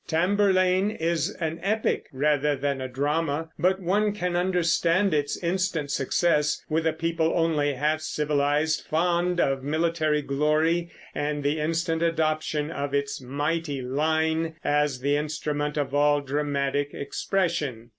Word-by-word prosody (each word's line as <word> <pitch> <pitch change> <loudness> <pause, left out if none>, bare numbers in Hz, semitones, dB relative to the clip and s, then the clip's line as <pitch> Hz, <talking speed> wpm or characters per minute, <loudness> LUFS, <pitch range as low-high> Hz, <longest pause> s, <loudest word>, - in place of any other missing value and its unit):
Tamburlaine 185 +2 +2
is 170 -4 -1
an 165 -1 -3
epic 215 +2 0
rather 145 +1 +1
than 140 0 -2
a 130 - -3
drama; 145 +4 -1
but 185 +4 +2
one 200 +3 +1
can 180 -3 -2
understand 180 +1 +2
its 145 -1 0
instant 170 -4 -1
success 150 +1 +1
with 160 +1 0
a 160 - +1
people 165 0 0
only 150 -4 +1
half 150 +4 0
civilized, 150 +1 0
fond 175 +2 +1
of 135 -4 +1
military 155 0 0
glory, 155 +5 +1 0.2
and 145 0 -2
the 145 +2 0
instant 165 +1 -1
adoption 155 -2 0
of 140 -2 -3
its 140 -1 -2
"mighty 145 +2 -2
line" 160 +4 0
as 145 -3 +1
the 140 +2 +1
instrument 150 0 -2
of 145 -2 -2
all 145 0 +3
dramatic 145 0 -1
expression. 145 -7 -2
155 Hz, 135 wpm, -26 LUFS, 145-170 Hz, 0.2 s, all